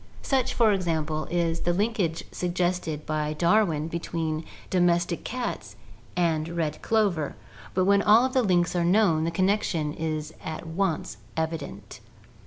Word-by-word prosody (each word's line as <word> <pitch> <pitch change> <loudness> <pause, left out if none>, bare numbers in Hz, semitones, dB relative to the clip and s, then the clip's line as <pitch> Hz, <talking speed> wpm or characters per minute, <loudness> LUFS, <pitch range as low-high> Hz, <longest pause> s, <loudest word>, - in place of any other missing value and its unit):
Such, 265 -3 +1
for 225 -3 +4
example, 160 -5 -1
is 170 -1 0
the 175 - 0
linkage 195 -4 0
suggested 175 -3 -1
by 155 -1 -1
Darwin 170 -2 +2
between 165 -1 -3 0.3
domestic 175 -1 +2
cats 250 0 -4 0.4
and 165 -2 +1
red 165 -3 -2
clover, 200 -10 +1 0.4
but 185 0 +3
when 200 +1 +4
all 215 +5 +6
of 260 - -2
the 260 - +4
links 180 -5 +2
are 175 - +2
known, 175 -3 +3
the - - +1
connection 175 -4 0
is 155 -1 -3
at 160 +1 -5
once 165 0 -2 0.2
evident. 155 -11 -4
170 Hz, 140 wpm, -26 LUFS, 160-190 Hz, 0.4 s, all